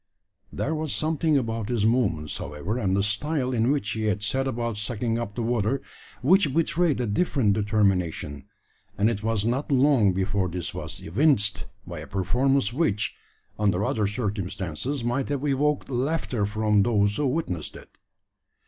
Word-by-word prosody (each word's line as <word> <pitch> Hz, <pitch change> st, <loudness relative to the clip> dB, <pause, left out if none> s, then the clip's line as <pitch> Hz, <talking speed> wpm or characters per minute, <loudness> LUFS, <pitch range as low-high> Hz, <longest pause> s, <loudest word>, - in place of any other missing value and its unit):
There 160 Hz, -, -2 dB
was 155 Hz, -2 st, -2 dB
something 155 Hz, -1 st, +1 dB
about 115 Hz, -3 st, -2 dB
his 115 Hz, -4 st, +1 dB
movements, 100 Hz, -11 st, +1 dB
however, 75 Hz, -, -4 dB
and 95 Hz, -4 st, +1 dB
the 100 Hz, -, +2 dB
style 130 Hz, +5 st, -1 dB
in 115 Hz, 0 st, +2 dB
which 135 Hz, -8 st, -1 dB
he 110 Hz, 0 st, -2 dB
had 105 Hz, -1 st, 0 dB
set 135 Hz, +5 st, 0 dB
about 115 Hz, -3 st, -2 dB
sucking 115 Hz, +2 st, -2 dB
up 105 Hz, -3 st, -5 dB
the 120 Hz, -, -2 dB
water, 120 Hz, +2 st, +1 dB, 0.4 s
which 155 Hz, -1 st, +4 dB
betrayed 165 Hz, -2 st, +2 dB
a 125 Hz, -, 0 dB
different 115 Hz, -, +2 dB
determination; 95 Hz, -9 st, 0 dB, 0.5 s
and 105 Hz, +3 st, +3 dB
it 105 Hz, -3 st, -4 dB
was 110 Hz, -1 st, 0 dB
not 130 Hz, +6 st, -1 dB
long 130 Hz, -6 st, +4 dB
before 95 Hz, 0 st, 0 dB
this 90 Hz, 0 st, -4 dB
was -, -, -7 dB
evinced 110 Hz, -, +2 dB, 0.2 s
by -, -, -7 dB
a -, -, -8 dB
performance 125 Hz, +5 st, +1 dB
which, 125 Hz, -9 st, 0 dB, 0.5 s
under 100 Hz, -1 st, +2 dB
other 105 Hz, -2 st, +1 dB
circumstances, 105 Hz, -, -3 dB
might 120 Hz, +3 st, -1 dB
have 145 Hz, 0 st, -1 dB
evoked 145 Hz, +1 st, +1 dB
laughter 130 Hz, -4 st, -1 dB
from 105 Hz, 0 st, +2 dB
those 105 Hz, -2 st, +2 dB
who 150 Hz, -, +1 dB
witnessed 125 Hz, -, -2 dB
it. -, -, -13 dB
115 Hz, 160 wpm, -26 LUFS, 100-135 Hz, 0.5 s, which